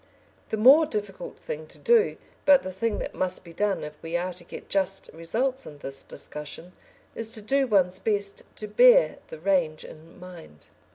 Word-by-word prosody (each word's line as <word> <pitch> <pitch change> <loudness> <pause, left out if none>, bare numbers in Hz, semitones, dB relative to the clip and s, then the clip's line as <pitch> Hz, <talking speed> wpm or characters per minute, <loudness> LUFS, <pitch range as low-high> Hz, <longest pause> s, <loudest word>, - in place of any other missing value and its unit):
The 220 - -2
more 275 +8 +7
difficult 205 - -5
thing 155 +1 -7
to - - -13
do, 470 -2 +3 0.3
but 285 -2 +6
the 185 - -5
thing 215 +3 -1
that - - -5
must 185 0 -1
be 170 - -13
done 205 +2 -1
if 150 0 -9
we 165 +1 -2
are 180 +1 -3
to 175 0 -10
get - - -10
just 195 0 -1
results 245 +12 -1
in 150 - -10
this 135 -1 -6
discussion, 150 +4 -7 0.4
is 225 -1 +1
to 220 - -4
do 270 +5 +1
one's 185 -4 +2
best 200 -2 0
to 215 - -4
bear - - +5
the - - -9
range 165 -3 0
in 160 +3 -14
mind. 175 - -13
190 Hz, 185 wpm, -26 LUFS, 165-225 Hz, 0.4 s, more